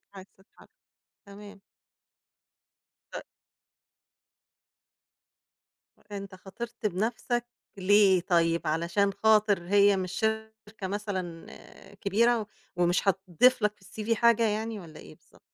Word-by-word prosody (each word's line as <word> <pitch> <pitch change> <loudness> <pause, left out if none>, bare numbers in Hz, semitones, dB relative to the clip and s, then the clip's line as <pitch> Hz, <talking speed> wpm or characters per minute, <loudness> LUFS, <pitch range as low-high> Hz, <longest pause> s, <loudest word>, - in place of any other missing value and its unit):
عايز 190 0 -11
تتحرك 190 - -22 0.6
تمام. 205 0 -12 1.5
ت - - -6 2.9
أنت 200 -1 -7
خاطرت 215 +5 -9
بنَفْسك 230 +5 -1 0.3
ليه 195 -1 +4
طيّب، 170 -2 +1
علشان 170 +6 0
خاطر 205 -3 +2
هي 200 0 +4
مش 185 -1 -3
شركة 220 -1 -4
مثلًا 185 -4 -5
آآ 200 - -16
كبيرة 220 +3 +1 0.3
ومش 175 +2 +1
هتضيفلك 195 +4 +2
في - - -34
الCV 220 +3 -2
حاجة 235 0 +3
يعني 220 +1 -3
والّا 160 -4 -12
إيه 80 - -13
بالضبط؟ - - -26
200 Hz, 100 wpm, -28 LUFS, 185-220 Hz, 2.9 s, ليه